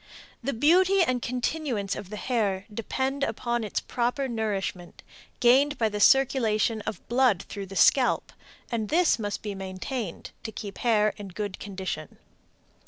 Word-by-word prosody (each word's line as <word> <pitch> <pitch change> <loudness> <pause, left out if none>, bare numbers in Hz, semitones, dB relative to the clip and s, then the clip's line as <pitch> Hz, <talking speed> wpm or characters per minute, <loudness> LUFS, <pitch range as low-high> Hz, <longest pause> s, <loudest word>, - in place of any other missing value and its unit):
The 275 - -1
beauty 360 - +4
and 255 -6 0
continuance 245 -4 -2
of 195 - -7
the 210 - -6
hair 205 -6 -1
depend 265 +5 -2
upon 235 -1 -1
its 210 - -2
proper 245 +3 -1
nourishment, 205 -6 -3 0.4
gained 275 +4 +4
by 225 -2 +2
the 210 0 -4
circulation 225 -3 +3
of - - -5
blood 240 -6 +3
through 200 -2 -7
the 195 - -9
scalp, 255 +4 +3 0.4
and 220 -3 -2
this 335 -5 +3
must 205 -2 -3
be 210 -2 -3
maintained 190 +2 -5
to 220 - -6
keep 205 -1 -7
the - - -13
hair 215 -3 +3
in 205 - -7
good 195 +1 -5
condition. 190 -6 -5
225 Hz, 155 wpm, -27 LUFS, 200-260 Hz, 0.4 s, beauty